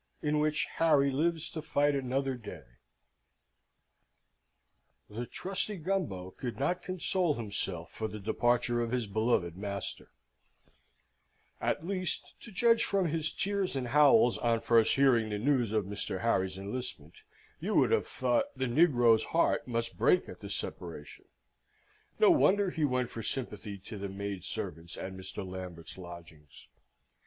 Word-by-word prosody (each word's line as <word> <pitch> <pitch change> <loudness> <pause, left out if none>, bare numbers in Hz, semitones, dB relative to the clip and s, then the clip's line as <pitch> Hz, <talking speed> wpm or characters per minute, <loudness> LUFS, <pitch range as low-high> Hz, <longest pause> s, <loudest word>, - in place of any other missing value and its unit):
In 150 0 +1
which 155 0 +1
Harry 145 -4 +4
lives 165 +3 0
to 160 - -5
fight 145 -1 +2
another 135 0 -1
Day 120 -4 -9 2.5
The 120 +3 -5
trusty 195 +2 -3
Gumbo 155 - -2
could 120 +3 -6
not 175 +6 0
console 185 -3 0
himself 100 -6 -4
for 110 - -3
the 105 - -7
departure 120 +3 +1
of 115 - -1
his 125 -1 -1
beloved 100 -5 0
master: 100 +1 -5 1.5
at 160 - -1
least, 185 -1 -2
to 230 - -9
judge 230 +3 +4
from 195 -4 +1
his 160 0 -1
tears 195 -4 -1
and 125 -3 -2
howls 140 -3 +5
on 115 -1 +1
first 115 -2 +4
hearing 125 -5 +4
the 105 - -2
news 120 -1 +1
of 110 -3 +1
Mr. 100 -1 -4
Harry's 95 -5 +1
enlistment, 125 - -5 0.4
you - - -2
would - - +4
have 455 - +2
thought 290 -2 +1
the 130 - 0
negro's 120 -5 +4
heart 165 - +1
must 115 -1 -3
break 180 - +4
at - - -10
the - - -8
separation. - - -6 0.9
No 435 -4 +6
wonder 205 - +4
he 160 -3 0
went 125 -3 0
for 115 - -5
sympathy 105 -4 -4
to 100 +2 -9
the 100 0 -4
maid 100 -1 -5
servants 85 -6 -5
at 95 - -5
Mr. 95 0 -7
Lambert's 90 -3 -8
lodgings. 85 -5 -12
120 Hz, 145 wpm, -31 LUFS, 100-155 Hz, 2.5 s, No